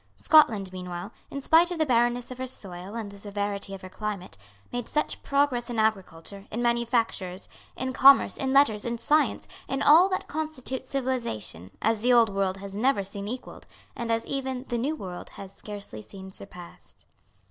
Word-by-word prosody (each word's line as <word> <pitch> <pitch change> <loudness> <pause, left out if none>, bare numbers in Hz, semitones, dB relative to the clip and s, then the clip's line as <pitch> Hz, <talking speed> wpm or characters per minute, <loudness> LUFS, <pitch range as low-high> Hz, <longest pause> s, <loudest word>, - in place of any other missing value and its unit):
Scotland, 220 -12 +4
meanwhile, 180 +2 -6 0.2
in 280 - -5
spite 330 +5 +5
of 355 - -3
the 315 - +2
barrenness 240 -1 +1
of 255 - -8
her 260 - -3
soil 190 -3 -5
and 220 -3 -5
the 200 - -10
severity 200 -1 -3
of 190 - -12
her - - -6
climate, 200 - -5 0.4
made 245 -1 -3
such 300 - -1
progress 275 -4 +1
in 240 - -3
agriculture, 200 -3 -1
in 225 - -4
manufactures, 235 -6 0 0.3
in 260 0 -2
commerce, 275 +1 +7
in 265 -1 -1
letters, 265 -7 +4
in 235 0 -2
science, 300 +7 +2 0.2
in 270 - -1
all 335 +6 +7
that 375 - -2
constitutes 265 -4 -4
civilisation, 235 - -3
as 225 -1 +2
the 250 +2 +3
Old 230 -4 +5
World 195 -1 0
had 195 0 -8
never 215 0 +2
seen 200 +1 -5
equalled, 250 +4 -7 0.3
and 235 -1 -4
as 225 0 0
even 265 -2 -3
the 240 -2 -1
New 285 +6 -1
World 185 -9 -7
has 195 -1 -9
scarcely 200 - -7
seen 190 - -11
surpassed. 180 -2 -11
230 Hz, 180 wpm, -27 LUFS, 195-260 Hz, 0.4 s, commerce